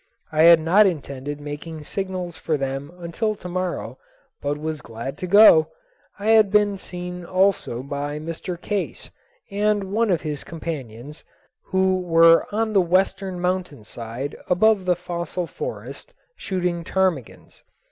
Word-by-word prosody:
I 155 +1 +4
had 170 -1 +8
not 185 +6 +5
intended 145 -4 -4
making 150 +2 -7
signals 185 0 -4
for 155 -2 -1
them 135 +2 -4
until 180 +6 -2
to 180 - -9
morrow 180 0 -4 0.4
but 145 +1 -2
was 155 0 -4
glad 115 +5 -7
to 185 - -4
go. 200 -5 +7 0.5
I 205 +2 -2
had 220 -2 +6
been 205 0 +3
seen 180 -1 -7
also 185 -9 0
by 145 +1 -4
Mr. 165 +3 -6
Case 205 +1 -4 0.4
and 205 -1 0
one 225 +1 +2
of 175 -4 +1
his 150 -3 -2
companions, 150 -4 -7 0.4
who 190 0 +1
were 165 -1 +5
on 220 +1 -1
the 195 - +5
western 190 +1 0
mountain 180 -8 -2
side 115 +5 -6
above 200 +1 +3
the 180 -1 +3
fossil 175 0 -4
forest, - - -7 0.2
shooting 180 - -2
ptarmigans. 180 -9 -2
175 Hz, 140 wpm, -23 LUFS, 150-190 Hz, 0.5 s, had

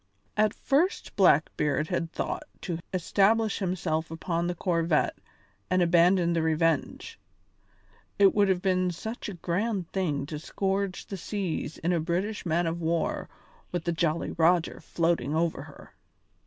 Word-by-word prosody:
At 215 0 +2
first 335 +9 0
Blackbeard 150 -4 +3
had 165 -1 -2
thought - - -3 0.2
to 170 -3 -3
establish 200 +4 +2
himself 170 -4 -1
upon 170 +1 -2
the 175 - -2
corvette 165 -3 +1 0.5
and 185 +1 +2
abandon 175 +1 +4
the 165 - +1
Revenge. 160 -1 0 1.0
It 200 -1 +6
would 205 -1 +3
have 185 -1 +1
been 185 -1 +2
such 220 +6 -5
a 200 - -6
grand 185 +2 -2
thing 150 -8 -1
to 150 +1 -6
scourge 195 +3 -2
the 195 - -6
seas 180 -5 -3
in 175 +2 0
a 170 - +2
British 180 +5 -2
man 170 +2 +1
of 165 +1 -2
war 165 0 -1 0.4
with 175 -2 -2
the 170 - 0
Jolly 165 -1 0
Roger 170 0 +2
floating 165 -4 0
over 165 0 0
her. - - -13
175 Hz, 145 wpm, -28 LUFS, 165-190 Hz, 1.0 s, It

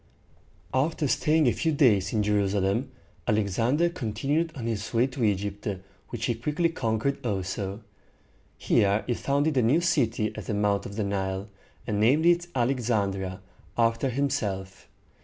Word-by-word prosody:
After 145 +3 +1
staying 155 +3 +2
a - - +5
few 160 - 0
days 105 -10 +3
in 110 -2 +1
Jerusalem, 100 +3 +1 0.4
Alexander 115 - +2
continued 145 +2 -1
on 120 -4 -5
his 110 -2 -3
way 115 +2 +4
to 130 -1 -4
Egypt, 100 0 -1 0.4
which 120 -2 -3
he 120 - +1
quickly 150 +9 0
conquered 130 -1 -1
also. 100 -1 -3 0.8
Here 100 +1 +2
he 125 - 0
founded 140 +4 0
a - - +5
new 125 +8 +3
city 120 - +1
at 110 - -7
the 105 - -1
mouth 100 -1 +1
of 100 - -9
the 110 - -1
Nile, 95 0 -2 0.4
and 105 -3 -1
named 135 +9 +4
it 175 0 +4
Al 120 0 +2
ex 125 -3 -3
an´dri 100 -4 0
a, 95 - -12 0.4
after 115 +3 +2
himself. 110 -8 -2
115 Hz, 160 wpm, -27 LUFS, 100-140 Hz, 0.8 s, a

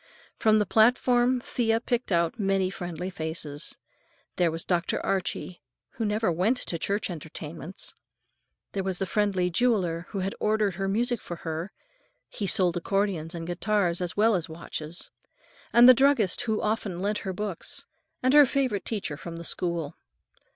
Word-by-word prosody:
From 215 -1 +4
the 210 - +2
platform 245 +4 +4
Thea 225 -2 +1
picked 240 -1 -2
out 170 +4 +1
many 195 -2 +1
friendly 180 -1 -5
faces. 160 -3 -4 0.6
There 175 -2 +3
was 165 +1 -4
Dr. 175 -1 0
Archie, 185 -1 -2 0.3
who 225 - -3
never 210 -2 +1
went 190 +10 +2
to 170 -8 -2
church 200 +1 -1
entertainments; 160 +2 -6 0.8
there 195 - -2
was 190 -1 -1
the 195 - -1
friendly 190 -2 +1
jeweler 180 -6 +1
who 195 -2 -2
ordered 210 -2 +1
her 195 +2 -2
music 235 +3 0
for 175 - -6
her,—he 190 - -7
sold 180 -2 +3
accordions 180 -3 -1
and 165 -1 -5
guitars 175 0 0
as 180 +1 -1
well 220 +2 +5
as 175 -5 -1
watches,—and 170 +8 -1
the 255 - +11
druggist 265 -7 +3
who 220 -2 0
often 210 -4 -1
lent 205 +3 -1
her 190 - -4
books, 195 -1 -4 0.4
and 255 +1 +3
her 295 -2 +8
favorite 255 -7 0
teacher 195 -10 -3
from 170 +2 -7
the 170 - -7
school. 170 -3 -3
195 Hz, 150 wpm, -27 LUFS, 170-220 Hz, 0.8 s, the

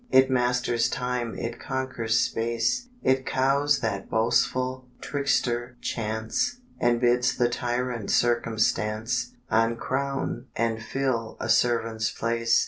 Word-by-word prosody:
It 130 0 +5
masters 125 -1 +2
time, 125 -2 -2
it 115 0 -4
conquers 130 -4 -1
space, 115 - 0 0.2
It 130 0 +3
cowes 140 +2 +2
that 100 -4 -2
boastful 125 +3 +1
trickster 125 -4 -1
Chance, 110 - -2 0.2
And 120 0 +3
bids 125 +1 +2
the 120 - +3
tyrant 120 -3 -2
Circumstance 115 0 +1 0.2
Uncrown 120 +3 0
and 115 -1 0
fill 115 -1 -2
a 110 - -3
servant's 115 -1 +2
place. 115 +1 +1
120 Hz, 110 wpm, -26 LUFS, 115-130 Hz, 0.2 s, It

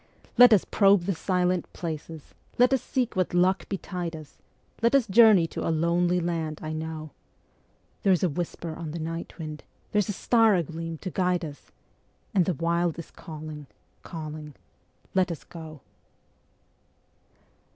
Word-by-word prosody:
Let 245 -1 +9
us 210 -4 +5
probe 200 -3 +4
the 195 +2 0
silent 180 +1 0
places, 160 -2 -6 0.2
let 250 +2 +5
us 265 - +2
seek 250 -3 -1
what 185 -1 0
luck 185 +2 +2
betide 180 -3 -4
us; 155 -2 -12 0.4
Let 235 +4 +3
us 270 -4 +4
journey 215 -4 +6
to - - -4
a - - +1
lonely 170 +2 +2
land 165 -3 -2
I 155 0 -4
know. 155 -1 -5 0.9
There's 190 -3 +3
a 180 - +3
whisper 165 +1 -4
on 165 -2 -6
the - - -4
night 165 +1 -5
wind, 155 -3 -7 0.3
there's 210 0 +1
a - - 0
star 225 +1 +4
agleam 165 -1 -3
to 185 - -4
guide 180 -1 0
us, 145 -2 -11 0.6
And 185 -4 +4
the 180 - 0
Wild 170 +2 0
is 170 - -8
calling, 155 -2 -9 0.3
calling.. 155 -3 -7 0.6
.let 185 -1 +2
us 165 - -6
go. 160 -4 -10
170 Hz, 150 wpm, -27 LUFS, 160-190 Hz, 0.9 s, Let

